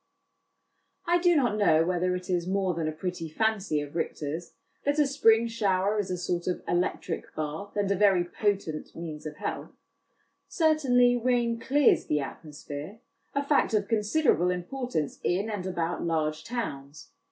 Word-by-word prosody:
I 345 +1 +3
do 350 0 +4
not 245 -8 +2
know 165 -6 +4
whether 180 +1 0
it 180 0 -6
is 175 -1 0
more 190 -1 +1
than 165 -1 -2
a - - 0
pretty 165 +1 -4
fancy 200 -3 0
of 145 +1 -8
Richter's, 160 0 -3 0.3
that 285 +1 +1
a 300 - +5
spring 235 -5 +4
shower 205 -2 +1
is 200 -2 -2
a 180 - -2
sort 175 0 -2
of 180 - -2
electric 175 -1 -2
bath, 155 +6 -5
and 200 -1 0
a - - +3
very 195 -2 +4
potent 185 -4 -2
means 155 -2 -6
of 150 0 -8
health; - - -5 0.7
certainly 265 -7 +3
rain 240 -1 +1
clears 275 +3 +3
the 150 - +1
atmosphere 150 +6 -7 0.4
a 280 - +1
fact 280 -5 +2
of 205 -1 +1
con 225 0 +2
siderable 210 - +2
importance 180 - -3
in 200 +5 0
and 190 -3 -4
about 170 -2 -2
large 155 -2 -1
towns. 145 - -6
185 Hz, 165 wpm, -28 LUFS, 165-230 Hz, 0.7 s, a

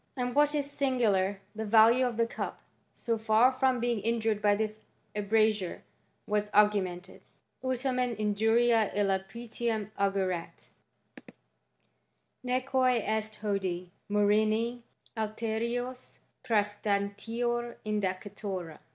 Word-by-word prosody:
And 245 -1 -1
what 295 +2 +3
is 290 -2 0
sin^lar, 235 -9 +1 0.2
the 220 - -3
value 225 +4 +5
of 235 -2 -4
the 230 - +3
cup, 230 - -6 0.3
so 230 -1 -2
far 220 +3 +4
from 260 -1 +1
being 240 -1 0
injured 220 0 0
by 205 -1 +3
tliia 215 0 -2 0.4
abrasure, 210 -2 +1 0.4
was 210 0 -1
augmented: 195 -3 +2 0.2
" - - -46
ut 260 -1 0
tamen 250 -2 -1
injuria 225 +1 +2
ilia 195 -2 +1
pretium 230 -2 -3
augeret; 190 -3 -1 1.7
neque 255 -1 +1
est 215 0 -2
hodie 185 -4 -2 0.2
murrhini 215 +3 +2 0.3
alteriua 230 +3 -3 0.3
prsstantior 215 +3 -1
indicatura." 195 -4 -3
220 Hz, 105 wpm, -30 LUFS, 205-240 Hz, 1.7 s, value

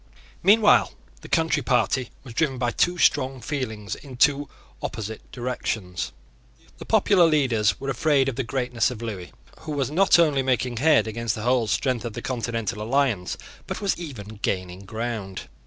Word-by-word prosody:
Meanwhile 210 +1 +5 0.3
the - - -11
Country 160 -2 +2
Party 125 0 +1
was 125 -3 -10
driven 135 0 0
by 120 -1 0
two 175 +7 +1
strong 130 -5 +2
feelings 115 -5 -4
in 135 -3 -9
two 145 +2 +3 0.3
opposite 110 0 -6
directions. 115 -7 -3 0.7
The - - -8
popular 185 -4 +5
leaders 125 -9 +2
were 135 0 -2
afraid 140 +1 +2
of 135 - -1
the 135 - -1
greatness 125 -1 0
of 120 -2 -7
Lewis, 100 -6 -5 0.3
who 155 -1 -6
was 140 -2 -1
not 190 +4 +5
only 150 -5 +3
making 125 -2 0
head 150 +4 +4
against 115 +1 -2
the 110 - -6
whole 120 -1 +2
strength 125 0 0
of 120 -3 -5
the - - -6
continental 115 -4 -3
alliance, 115 - 0 0.3
but - - -4
was 200 -2 0
even 110 - -8
gaining 95 0 -3
ground. 110 -3 -4
125 Hz, 165 wpm, -24 LUFS, 110-140 Hz, 0.7 s, Meanwhile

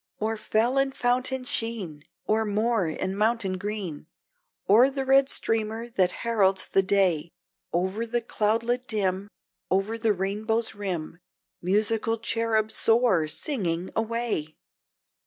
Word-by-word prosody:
O'er 220 +1 -1
fell 225 +4 +1
and 270 0 0
fountain 255 +1 0
sheen, 215 -12 -4 0.2
O'er 220 +1 +2
moor 215 -2 +1
and 185 +4 -3
mountain 210 -3 0
green, 195 -7 -5 0.6
O'er 230 +7 +6
the 270 -1 -3
red 270 +1 +5
streamer 225 +1 -1
that 190 -6 +2 0.2
heralds 195 -5 +2
the 195 - +3
day, 185 -5 +1 0.4
Over 190 +6 -1
the 240 +1 -1
cloudlet 230 +3 0
dim, 195 -2 -1 0.4
Over 195 +4 0
the 220 -2 +2
rainbow's 210 +4 -1
rim, 180 -5 -4 0.4
Musical 215 +4 +1
cherub, 225 -1 0
soar, 225 -8 +3
singing 180 - -2
away! 225 -9 -2
215 Hz, 120 wpm, -26 LUFS, 190-230 Hz, 0.6 s, O'er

